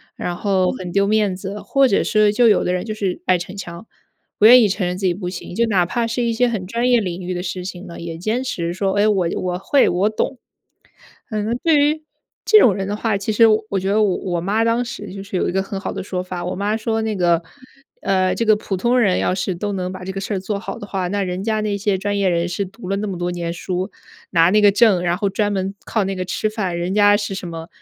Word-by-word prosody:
然 175 - -3
后 190 -1 +1
很 180 -2 -6
丢 200 +2 +2
面 210 -2 +1
子， 195 +2 -6
或 275 -1 +3
者 200 - +2
是， 210 -1 +3
就 235 +2 +4
有 215 - +4
的 180 - 0
人 180 - -1
就 215 -1 -4
是 195 -4 -3
爱 185 -1 +4
逞 180 +2 -7
强， 175 -1 -8 0.5
不 215 - +7
愿 245 +1 +9
意 - - +4
承 195 -2 -1
认 180 - -3
自 195 - -3
己 180 - +3
不 180 0 -5
行。 180 -1 -8
就 235 +5 +2
哪 190 -5 +2
怕 230 +6 -1
是 235 +1 -1
一 235 - 0
些 245 +2 +2
很 210 -5 -3
专 235 +6 -1
业 245 -2 +5
领 180 -3 -4
域 180 0 -4
的 175 - -3
事 185 0 -4
情 180 0 -7
呢， 170 -3 -9
也 170 -1 -6
坚 215 +9 -1
持 170 -9 -3
说： 190 +1 -1
“哎， 205 +1 +4
我 195 -5 +2
我 180 -1 -2
会、 275 +7 +3
我 185 +4 +1
懂。” 245 +4 -2 0.9
嗯， 210 -1 -1
那 225 - -1
对 325 -2 +4
于 300 +2 +1 0.4
这 430 - +6
种 220 - +5
人 195 -1 -3
的 205 +2 -3
话， 215 -2 0
其 200 +2 -3
实 225 +2 +6
我 215 0 +2
我 195 - 0
觉 190 - -3
得 215 +2 +3
我 195 -3 +1
我 175 -2 -3
妈 210 +5 +1
当 230 +1 +2
时 210 -5 -7
就 195 0 -7
是 195 -2 -4
有 - - 0
一 - - -2
个 190 0 +1
很 195 0 -5
好 - - -4
的 - - -5
说 185 -1 -3
法， 180 -1 -6
我 180 - -3
妈 205 +3 -1
说 225 0 -1
那 220 -1 -2
个： 175 -3 +2 0.6
“呃， 185 -1 +1
这 230 - -1
个 215 -1 +5
普 205 -2 -4
通 240 +6 +2
人 195 -6 +3
要 - - +1
是 185 0 -2
都 205 +4 -3
能 185 -1 -3
把 185 -1 -8
这 190 - -4
个 195 - -5
事 200 +1 -3
儿 - - -1
做 200 +2 -3
好 - - -6
的 - - -8
话， 190 -2 -2
那 200 +2 -1
人 180 +1 -3
家 215 0 0
那 210 -1 -1
些 200 -1 0
专 205 +1 -2
业 195 -2 +2
人 170 0 0
士 180 +3 -2
读 195 +1 -11
了 195 - +1
那 210 +1 -3
么 190 -3 -4
多 175 0 -2
年 170 -1 -3
书， 185 +2 -4 0.4
拿 165 +1 +4
那 210 +1 +4
个 205 - +6
证， 205 -3 +4
然 175 0 0
后 205 0 0
专 205 +1 0
门 195 0 -2
靠 220 - 0
那 195 0 -2
个 185 - -2
吃 185 +4 -1
饭， 195 -5 -3
人 175 +2 -2
家 205 0 +5
是 205 -1 -4
什 190 -2 -5
么？ 165 -1 -7
195 Hz, 300 characters per minute, -20 LUFS, 180-215 Hz, 0.9 s, 愿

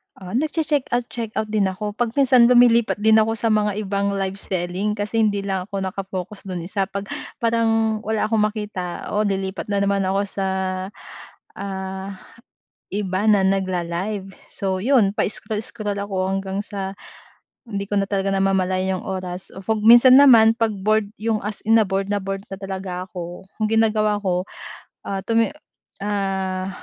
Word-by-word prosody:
Ah, 185 -1 -10
nagche-checkout 285 -3 0
checkout 220 -2 -4
din 210 -3 +2
ako 205 +3 -3
'pag 230 +2 -2
minsan 255 -4 +5
lumilipat 240 -2 +5
din 220 0 +6
ako 225 +1 +2
sa 225 0 0
mga 210 -1 +1
ibang 200 0 -1
live 195 0 -2
selling 185 +3 -2
kasi 210 +2 -2
hindi 205 -2 +2
lang 190 -2 -2
ako 195 -2 -4
naka-focus 190 +1 -5
do'n 180 -3 -4
isa, 195 +2 -1
'pag 200 0 -6 0.3
parang 225 -1 +2
wala 220 0 -2
akong 215 -1 +3
makita, 210 -5 -5
oh, 210 0 +1
lilipat 190 -1 -2
na 200 -1 0
naman 200 -1 +1
ako 195 +1 +1
sa, 195 -1 -3 1.1
ah, 190 0 -5 0.9
iba 190 -2 -1
na 205 -3 +5
nagla-live. 190 +1 -1 0.2
So 190 -1 -1
iyon 225 -2 +3
pa-scroll-scroll 210 -1 -2
ako 190 -2 -2
hanggang 195 +1 -2
sa 195 -2 -5 0.7
hindi 200 -3 -3
ko 205 - +2
na 195 - -1
talaga 195 -1 0
namamalayan 190 -1 +1
iyong - - -7
oras 185 -2 -5 0.2
'pag 220 -1 0
minsan 240 +3 +8
naman 230 -5 +7
'pag 225 -2 +1
bored 215 +1 +1
'yung 220 -1 -1
as 210 0 -3
in 225 - +6
na 225 - +6
bored 195 0 -2
na 205 -1 -1
bored 195 0 -5
na 195 - -6
talaga 190 -2 -5
ako 175 -1 -8 0.2
ang 215 - +1
ginagawa 215 -1 +2
ko, 180 0 0 0.6
ah, 195 -1 -3
tumi 230 0 +2 0.6
ah, 190 -2 -1
200 Hz, 160 wpm, -22 LUFS, 190-220 Hz, 1.1 s, minsan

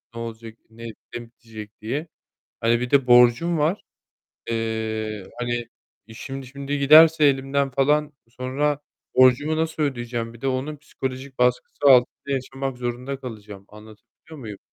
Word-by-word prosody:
ne - - -6
olacak, 115 0 -8
ne 115 +1 -11 0.3
ne 120 - -4
bitecek 110 -3 -12
diye. 145 +9 -3 0.5
Hani, 115 +1 +2
bir 125 0 -3
de 140 -2 +3
borcum 125 +7 +5
var. 160 +7 0 0.7
Eee, 110 -2 -3
hani, 120 -1 -2 0.4
işim 135 +4 -8
şimdi 140 +2 -4
giderse 155 +2 +7
elimden 135 0 +1
falan, 150 +3 +1 0.2
sonra 135 +4 -1 0.4
borcumu 130 +5 +4
nasıl 160 -1 -1
ödeyeceğim? 120 -4 -3
Bir 115 - -15
de 135 - -2
onun 135 +3 -2
psikolojik 130 -1 -7
baskısı 125 +3 0
altında 135 +1 +4
yaşamak 135 0 -5
zorunda 125 +2 -4
kalacağım, 105 -5 -9
anlatabiliyor 110 +8 -15
muyum? 105 -6 -8
130 Hz, 135 wpm, -23 LUFS, 115-140 Hz, 0.7 s, giderse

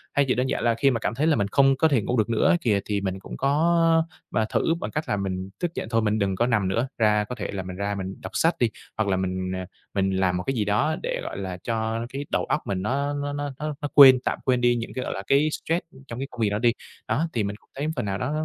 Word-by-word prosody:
thay 140 - +4
vì 125 - +2
đơn 125 +1 0
giản - - -1
là 115 -1 +3
khi 135 +4 +3
mà 115 - -1
cảm 110 - -2
thấy 150 +5 +1
là 160 - +4
mình 100 -2 0
không 135 +5 +4
có 160 +4 +4
thể 135 -7 +2
ngủ 125 +5 -1
được 110 +1 +1
nữa 115 +9 +2
ấy 185 -1 +5
kìa, 105 -4 +2
thì 100 -1 -1
mình 95 -1 -3
cũng - - -9
có 165 +3 +3 0.3
mà 110 +1 +1
thử 165 - +1
bằng - - -4
cách 155 +1 -3
là 105 - +1
mình 95 -1 -3
thức 175 -2 -1
giận - - -4
thôi 115 -1 +2
mình 105 0 +1
đừng 100 -2 0
có 120 +5 +1
nằm 105 -6 +1
nữa, 115 +7 0
ra 105 -2 +3
có 125 +4 -6
thể 105 - -4
là 95 -1 -4
mình 90 0 -7
ra 100 +2 -2
mình 95 0 -5
đọc - - -7
sách 165 +1 +3
đi, 120 - +3 0.3
hoặc 110 -1 0
là 95 - +2
mình, 95 0 -2
à, 95 - -4 0.3
mình 95 -1 +1
làm 95 -1 +1
một 90 - -3
cái 135 - -1
gì 110 -5 0
đó 105 +10 +1
để, - - -2
gọi - - -5
là, 95 -2 -4
cho 115 0 -2
cái 140 +2 -5
đầu - - 0
óc 140 +3 -2
mình 95 -2 -1
nó 140 +6 -1
nó 145 0 -3
nó 145 0 -3
nó 150 0 -3
nó 145 - -1
quên, 135 -3 +9
tạm - - -1
quên 125 -1 +2
đi 120 0 +4
những 115 -1 -4
cái, 130 - -3
gọi - - -3
là, - - -4
cái 145 +3 +4
stress 165 +3 -2 0.2
trong 115 0 -6
cái 135 - -3
công 125 - -7
việc 105 - +3
đó 105 - -1
đi. 120 0 +3 0.3
Đó, 165 +4 +1
thì 110 -3 0
mình 100 +1 -3
cũng - - -22
thấy 145 +3 -2
phần 125 -5 -2
nào 95 -1 -2
đó 125 +6 -2
115 Hz, 305 wpm, -25 LUFS, 100-140 Hz, 0.3 s, quên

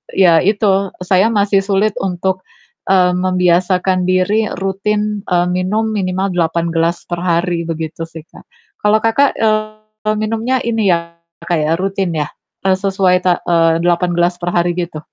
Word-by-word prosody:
ya 170 -4 +5
itu 195 -1 +1 0.2
saya 190 +4 +3
masih 200 -2 +2
sulit 200 +1 +1
untuk, 185 0 -2 0.5
eee, 180 -2 +4
membiasakan 180 0 +1
diri 205 +4 +1
rutin, 210 +2 -2
eee, 175 -1 +1
minum 210 +5 -1
minimal 190 -1 -1
8 170 0 0
gelas 165 +1 0
per 175 -1 -4
hari 170 -1 0
begitu 160 0 -4
sih, 160 -1 -11
Kak. - - -16 0.4
Kalau, 210 +1 +4
Kakak, 265 +5 +2
eee, 215 0 -2
minumnya 225 +4 -1
ini 225 -4 +1
ya, 170 0 -1 0.3
Kak, 170 -2 0
ya, 155 +1 0
rutin 190 -2 -2
ya? 150 0 -1 0.4
Eee, 190 -1 +4
sesuai, 190 -2 +2
ta 180 -1 +3
eee, 165 -1 +2
8 175 0 +1
gelas 175 0 +1
per 175 - -1
hari 175 0 +2
gitu? 170 -3 -4
185 Hz, 155 wpm, -16 LUFS, 175-205 Hz, 0.5 s, ya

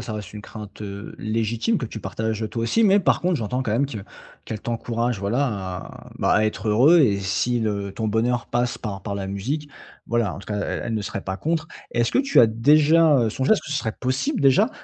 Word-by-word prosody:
ça 110 - -5
reste 105 -2 -7
une 105 - -7
crainte, 105 -2 -10
heu, 100 0 -7
légitime 115 - 0
que 120 - -3
tu 110 - -8
partages 110 0 -3
toi 115 +1 -3
aussi, 225 - +2
mais 200 -1 +5
par - - +2
contre 180 -1 +1
j'entends 125 +3 -2
quand 115 - -3
même 125 +6 +2
que 115 -6 -6 0.5
qu'elle 110 -1 -5
t'encourage 115 -1 -2
voilà 120 +8 +1
à 95 -5 -6
bah - - +2
à 110 - +4
être 110 0 -2
heureux 135 +11 +6
et 100 -8 +3
si 105 +5 0
le 100 -2 -2
ton 110 0 -2
bonheur 120 +3 0
passe 120 0 -1
par 100 -3 -5
par 100 - -4
la 100 -1 -4
musique, 135 +10 -3 0.4
voilà, 115 -4 0
en - - -8
tout - - -14
cas, 105 - -3
elle - - -3
elle 115 - -2
ne 105 - -1
serait 100 - -4
pas 95 0 -4
contre. 160 - -2 0.2
Est-ce 120 0 +1
que - - +1
tu 275 0 +4
as 115 - +7
déjà, 150 +6 +5
heu, 115 -2 +1
songé 130 - +1
est-ce 215 - +3
que - - -10
ce 150 - 0
serait 110 -4 -2
possible 130 - -1
déjà 140 - +5
115 Hz, 240 wpm, -23 LUFS, 105-140 Hz, 0.5 s, as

